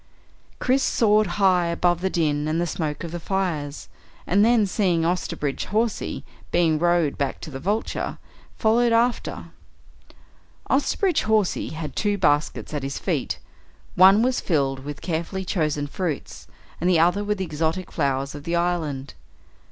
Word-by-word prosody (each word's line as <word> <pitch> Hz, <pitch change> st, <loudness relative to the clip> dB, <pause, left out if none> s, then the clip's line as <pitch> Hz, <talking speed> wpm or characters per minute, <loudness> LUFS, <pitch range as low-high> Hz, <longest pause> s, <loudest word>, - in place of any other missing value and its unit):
Chris 260 Hz, +2 st, +2 dB
soared 215 Hz, -4 st, +3 dB
high 185 Hz, -3 st, +3 dB
above 175 Hz, +1 st, +1 dB
the 190 Hz, -, +1 dB
din 150 Hz, -4 st, 0 dB
and 155 Hz, +2 st, 0 dB
the 175 Hz, -, +1 dB
smoke 155 Hz, -3 st, -3 dB
of 170 Hz, -, -5 dB
the 175 Hz, -, -4 dB
fires, 165 Hz, -6 st, -2 dB, 0.4 s
and 200 Hz, +3 st, +3 dB
then 230 Hz, -1 st, +4 dB
seeing 180 Hz, -4 st, +1 dB
Osterbridge 165 Hz, -5 st, -2 dB
Hawsey 220 Hz, +1 st, -1 dB, 0.3 s
being 160 Hz, -3 st, +2 dB
rowed 175 Hz, -3 st, +2 dB
back 140 Hz, -2 st, -1 dB
to 155 Hz, -, -7 dB
the 135 Hz, -, -6 dB
Vulture, 205 Hz, +9 st, -2 dB, 0.4 s
followed 235 Hz, +1 st, +3 dB
after. 235 Hz, +1 st, 0 dB, 1.2 s
Osterbridge 325 Hz, +5 st, +1 dB
Hawsey 215 Hz, -3 st, +1 dB
had 155 Hz, -1 st, -6 dB
two 205 Hz, -1 st, 0 dB
baskets 145 Hz, -3 st, 0 dB
at 145 Hz, -, -2 dB
his 135 Hz, 0 st, -4 dB
feet. -, -, -2 dB, 0.6 s
One 195 Hz, +4 st, +7 dB
was 255 Hz, 0 st, +1 dB
filled 135 Hz, -6 st, 0 dB
with 145 Hz, +2 st, -7 dB
carefully 175 Hz, +3 st, -3 dB
chosen 150 Hz, -5 st, -1 dB
fruits, 155 Hz, +1 st, -4 dB, 0.3 s
and 175 Hz, -, +2 dB
the 180 Hz, -, +4 dB
other 175 Hz, +5 st, +3 dB
with 210 Hz, 0 st, -1 dB
the 190 Hz, -, -2 dB
exotic 165 Hz, +3 st, -2 dB
flowers 135 Hz, -2 st, -1 dB
of 145 Hz, -1 st, -8 dB
the 170 Hz, +2 st, -1 dB
island. 160 Hz, -6 st, -1 dB
175 Hz, 150 wpm, -24 LUFS, 150-205 Hz, 1.2 s, One